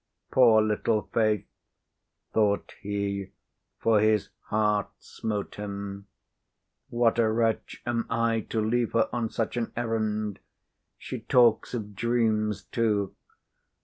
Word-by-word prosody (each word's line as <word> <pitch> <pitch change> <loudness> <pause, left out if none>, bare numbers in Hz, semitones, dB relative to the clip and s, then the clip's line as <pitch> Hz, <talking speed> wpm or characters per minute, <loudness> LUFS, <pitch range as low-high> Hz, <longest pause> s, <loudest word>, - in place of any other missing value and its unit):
"Poor 115 -4 +6
little 110 0 +1
Faith!" 110 -3 +2 0.9
thought 105 -2 +1
he, 100 -1 -2 0.5
for 110 -2 +3
his 110 -1 +2 0.2
heart 105 -1 +1
smote 105 -2 -5
him. 100 -1 -6 0.8
"What 120 -1 +2
a 115 -1 +4
wretch 115 0 -1
am 120 -1 -1
I 115 0 +1
to 115 - 0
leave 115 +2 0
her 115 -1 +3
on 120 -2 -1
such 115 +2 -2
an 115 -2 -2
errand! 110 -3 -1 0.6
She - - -6
talks 120 -1 +3
of 105 -3 -5
dreams, 110 -2 +1
too. 105 -4 0
110 Hz, 115 wpm, -27 LUFS, 105-115 Hz, 0.9 s, Poor